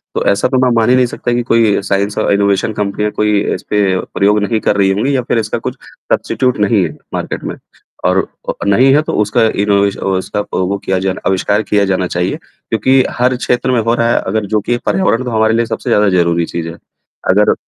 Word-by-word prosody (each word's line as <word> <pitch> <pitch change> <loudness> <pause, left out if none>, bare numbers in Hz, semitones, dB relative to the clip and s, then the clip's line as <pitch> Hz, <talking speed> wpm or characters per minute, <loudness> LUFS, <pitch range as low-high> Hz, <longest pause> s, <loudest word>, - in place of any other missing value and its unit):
तो - - -1
ऐसा 100 - +1
तो 130 - +1
मैं 125 - +3
मान 115 +1 +2
ही 125 - +5
नहीं 130 -1 +4
सकता 120 0 -3
कि 120 - +1
कोई 115 -4 +2
साइंस 100 +1 -1
और - - +1
इनोवेशन 100 +1 +1
कंपनियाँ 105 +1 -2
कोई 105 -1 +1 0.2
इसपे 105 0 -2 0.3
प्रयोग 105 +2 +3
नहीं 110 +1 0
कर - - +1
रही 95 -1 +3
होंगी 125 +8 0
या 130 - +1
फिर 120 - -1
इसका 110 -1 -2
कुछ - - -5 0.4
सब्स्टीट्यूट 130 -2 0
नहीं 105 -2 +2
है 80 - -6 0.2
मार्केट - - -4
में - - -4 0.5
और - - +3 0.3
अ, - - 0
नहीं 130 +7 +4
है 150 - +4
तो - - -4
उसका 110 +3 +1 0.2
इनोवेशन 100 -1 +1
उसका 95 +2 -1
वो 95 +2 0
किया 95 0 0
आविष्कार 100 +2 +1
किया 100 0 +1
जाना 95 -1 0
चाहिए। 90 +1 -2
क्योंकि 130 +5 0 0.2
हर 125 +1 +2
क्षेत्र 125 0 0
में 125 - +2
हो 115 +1 +1
रहा 115 0 +1
है - - +2
अगर 105 +1 -1
जो - - +3
कि 120 +4 -1
पर्यावरण 130 -10 +1
तो 125 - -3
हमारे 110 0 +2
लिए 115 - +1
सबसे - - -4
ज़्यादा 105 -1 +3
ज़रूरी 85 -2 +1
चीज़ 85 0 -5
है। - - -7 0.6
अगर 105 +2 +4
105 Hz, 215 wpm, -14 LUFS, 100-115 Hz, 0.6 s, ही